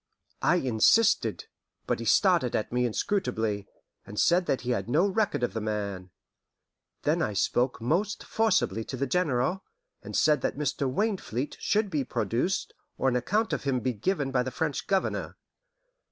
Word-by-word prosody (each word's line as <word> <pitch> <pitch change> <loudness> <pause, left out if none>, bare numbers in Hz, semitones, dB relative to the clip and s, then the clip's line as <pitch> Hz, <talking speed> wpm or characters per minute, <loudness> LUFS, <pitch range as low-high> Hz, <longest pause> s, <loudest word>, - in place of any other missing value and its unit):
I - - +3
insisted, 130 - +3 0.4
but - - -1
he - - -5
stared 175 - +3
at 110 - -2
me 125 0 +1
inscrutably, 110 - -1 0.4
and 105 +1 -6
said 175 +1 +3
that 135 - 0
he 125 - -2
had 120 - -2
no 155 +9 +3
record 205 - 0
of 120 - 0
the 110 - -3
man. 100 -3 -3 0.9
Then - - +1
I 105 - 0
spoke 125 +5 +1
most 175 - -1
forcibly 215 - +1
to 130 - -5
the 140 - 0
General, 150 +3 0 0.4
and - - -4
said 150 -3 +3
that - - -2
Mr. 140 -2 -1
Wainfleet 165 - -2
should 210 -1 +1
be 150 -4 0
produced, 130 +8 -1 0.2
or 135 - +2
an 125 - -1
account 210 - 0
of - - -2
him 135 -2 +1
be 125 +2 -1
given 140 - -1
by 130 -1 +2
the 130 - -2
French 150 +2 -3
Governor. 195 -1 -1
135 Hz, 170 wpm, -28 LUFS, 120-185 Hz, 0.9 s, I